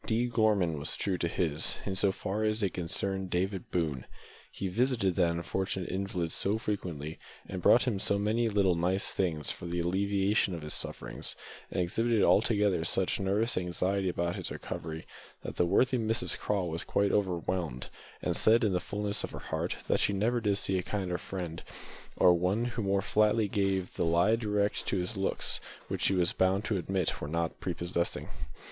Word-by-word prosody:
D. 115 +2 +2
Gorman 105 -9 +2
was 70 - -4
true 95 -3 -1
to 85 - +1
his, 80 -3 0
in 95 - -2
so 95 +1 +3
far 95 +2 -3
as 110 +1 +1
they 100 - +2
concerned 95 +2 -2
David 95 +1 -1
Boone. 75 -7 -1 0.5
He 100 - -4
visited 115 -1 +1
that 85 -1 +3
unfortunate 90 +2 -2
invalid 95 -4 -2
so 100 +3 0
frequently, 85 -9 -4 0.3
and 95 -1 -5
brought 120 - +6
him 115 -6 0
so 100 - +1
many 110 +3 +1
little 100 -3 +3
"nice 90 +3 +1
things" 80 -6 0
for 85 - -7
the 85 +1 -2
alleviation 95 +2 +1
of 80 - -7
his 75 - -2
sufferings, - - -2 0.3
and - - -3
exhibited 110 +5 +2
altogether 105 -5 +3
such 90 +2 +1
nervous 100 +4 +1
anxiety 90 +2 0
about 85 0 -1
his - - -2
recovery, 80 0 -6 0.4
that - - -1
worthy 125 +9 +3
Mrs 115 +1 +1
Craw 100 -3 -1
was 85 -1 -2
quite 100 0 +1
overwhelmed, 90 -8 -1 0.3
and - - 0
said, 115 +2 +4
in 105 -4 +2
the 90 - +2
fulness 105 +2 -1
of - - -3
her - - -8
heart, - - -3
that - - +2
she 100 - +2
never 115 +5 +1
did 100 -2 +2
see 95 -2 +1
a - - 0
kinder 90 -2 -2
friend, 90 -4 -5 0.5
or 90 - +6
one 90 +7 +1
who 120 -1 -3
more 100 -1 +1
flatly 105 0 +3
gave 95 -2 0
the - - -1
lie 85 +7 +4
direct 105 -2 -1
to - - +1
his 90 +5 -2
looks, 95 0 0 0.3
which, - - -3
she - - +3
was 90 -2 +2
bound 95 +3 +2
to 105 - 0
admit, 95 -1 -1
were 75 - -3
not 85 +1 -2
prepossessing. 85 -1 -2
95 Hz, 185 wpm, -30 LUFS, 85-105 Hz, 0.5 s, brought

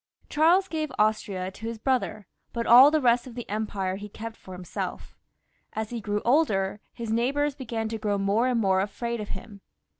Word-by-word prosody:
Charles 340 +6 +4
gave 310 -3 -3
Austria 205 -3 0
to 220 +4 -8
his 230 0 -4
brother, 220 -4 -1 0.3
but 235 -1 -2
all 250 +4 +9
the 310 +1 +2
rest 245 -2 +3
of 240 - -10
the 240 - -6
empire 200 -3 -2
he 205 +1 -8
kept 225 +2 -7
for 185 - -12
himself! 180 -1 -6 0.6
As 220 0 -4
he 235 -2 -4
grew 205 0 -2
older, 215 -8 +2
his 230 -2 -5
neighbours 275 +6 +1
began 235 -5 -4
to 225 0 -4
grow 205 -1 0
more 200 +5 +2
and 250 -2 +1
more 190 -3 +3
afraid 230 +4 -3
of 210 - -7
him. 200 +1 -12
225 Hz, 190 wpm, -26 LUFS, 205-250 Hz, 0.6 s, all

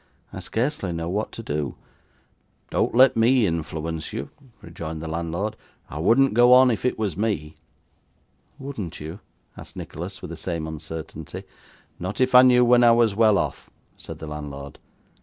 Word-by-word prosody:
'I - - -6
scarcely 120 - -2
know 85 0 -4
what 105 +4 -2
to 115 - -8
do.' 75 - -3 1.0
'Don't - - 0
let 130 +1 +6
me 115 +1 +4
influence 80 -2 -3
you,' 70 - -6 0.3
rejoined 85 -2 -7
the 80 - -6
landlord. 85 +6 -3 0.4
'I 75 - -5
wouldn't 115 +10 +4
go 120 +2 +6
on 130 0 +7
if 115 - -3
it 125 - 0
was 105 -7 -2
me.' 100 -8 -2 1.0
'Wouldn't 110 - -6
you?' 80 +6 -7 0.4
asked - - -12
Nicholas, 90 +5 -7
with 90 - -7
the 85 - -7
same 85 -3 -4
uncertainty. 80 0 -7 0.6
'Not 95 +3 -5
if 130 0 +2
I 125 - +10
knew 125 -1 +5
when 120 0 +5
I 120 -1 +7
was 115 -3 +3
well 110 -1 +4
off,' - - -3 0.3
said - - -9
the - - -8
landlord. 70 -2 -8
95 Hz, 165 wpm, -24 LUFS, 80-120 Hz, 1.0 s, I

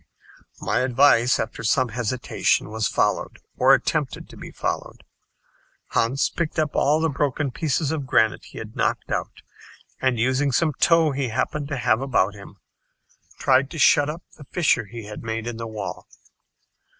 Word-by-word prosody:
My 110 - 0
advice, 125 -1 +4
after - - -4
some 125 +4 +2
hesitation, 120 -1 -1
was 110 -1 0
followed - - 0 0.2
or - - +6
attempted - - -2
to - - -13
be - - -9
followed. - - -4 0.9
Hans 130 +5 +1
picked 170 -3 -4
up 155 -2 0
all 150 +2 +3
the 165 - +2
broken 145 -1 -1
pieces 155 +1 -1
of 145 -4 -3
granite 110 -3 +2
he - - -13
had - - -8
knocked - - -1
out, - - -4 0.6
and 130 -2 +1
using 130 +4 +1
some 155 +3 +1
tow 165 -2 +4
he 135 -1 -2
happened 140 +6 -2
to 140 -2 -3
have 120 -1 +2
about 120 -7 +1
him, 100 -1 -12 0.8
tried 135 +1 +3
to 165 - -8
shut 145 -1 +5
up 165 +4 -6
the 145 - -12
fissure 140 -8 +1
he 115 +3 -9
had 105 0 -8
made 115 0 -4
in 120 -1 -5
the 115 0 -5
wall. 105 -2 -6
130 Hz, 165 wpm, -23 LUFS, 115-145 Hz, 0.9 s, or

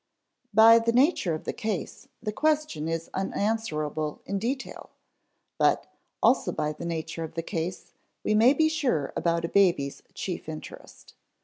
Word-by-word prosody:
By 225 +1 +8
the 230 0 +1
nature 245 - +3
of 155 - -7
the - - -3
case, 215 -7 -4 0.2
the 215 - -1
question 300 - 0
is 165 0 -3
unanswerable 160 -7 -2
in 200 - -2
detail; 260 +6 -4 0.7
but, - - +3 0.4
also - - +4
by 150 0 -2
the 160 +3 -8
nature 165 0 -4
of 160 - -8
the 165 - -2
case, 170 +2 -4 0.3
we - - +1
may 230 +5 +6
be 315 +2 +3
sure 255 - 0
about 170 0 0
a - - -1
baby's 170 -7 +2
chief 175 -4 -5
interest. 155 -1 -10
185 Hz, 150 wpm, -27 LUFS, 160-230 Hz, 0.7 s, By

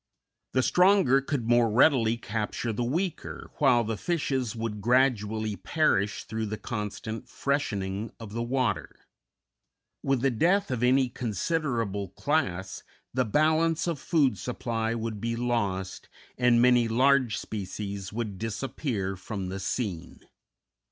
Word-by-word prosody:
The 130 - +3
stronger 180 -8 +4
could 135 -4 -2
more 120 -1 +4
readily 115 -1 +4
capture 110 +1 -3
the 120 - -1
weaker, 165 +8 -3
while 120 -1 +5
the 110 -1 -3
fishes 135 - -1
would 110 -2 -4
gradually 110 -3 +2
perish 100 -9 +1
through 110 +1 -3
the 105 +1 -4
constant 110 +2 -5
freshening 110 -8 -2
of 110 -3 -9
the 115 - -2
water. 125 +1 -1 1.0
With 135 -3 +1
the 135 0 +2
death 175 - +2
of 125 -2 -1
any 130 +1 +4
considerable 115 - -2
class, 95 - -1 0.3
the 130 0 +1
balance 155 +6 +2
of 170 -5 -2
food 140 - +2
supply 115 0 -2
would 110 -2 -4
be 115 0 -1
lost, 105 -6 -2 0.3
and 125 -1 +4
many 120 -1 +5
large 130 0 +3
species 100 -1 -5
would 105 -4 -4
disappear 115 -2 -3
from 95 0 -5
the 95 +1 -4
scene. 95 -3 -4
115 Hz, 130 wpm, -28 LUFS, 105-135 Hz, 1.0 s, while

